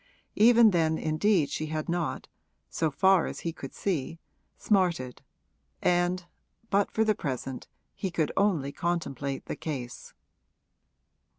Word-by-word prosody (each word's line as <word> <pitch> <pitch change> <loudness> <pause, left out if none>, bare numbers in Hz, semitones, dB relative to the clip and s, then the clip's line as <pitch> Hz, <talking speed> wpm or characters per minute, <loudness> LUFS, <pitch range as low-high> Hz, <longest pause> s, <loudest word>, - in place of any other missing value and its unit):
Even 230 0 +6
then 160 -3 +2
indeed 155 -1 +1
she 155 +2 -3
had 155 0 -3
not, 170 -2 -2 0.4
so 160 - 0
far 190 +3 +3
as - - -6
he 165 - -3
could 135 -4 -8
see, 165 -4 -2 0.4
smarted, 175 - 0 0.6
and 175 0 +1 0.5
but 200 0 +3
for 220 - +1
the 215 -1 +3
present 135 - -5 0.3
he 190 - -3
could 160 -3 -1
only 175 -9 +1
contemplate 140 -5 -3
the - - -4
case. 130 -6 -6
165 Hz, 125 wpm, -28 LUFS, 145-190 Hz, 0.6 s, Even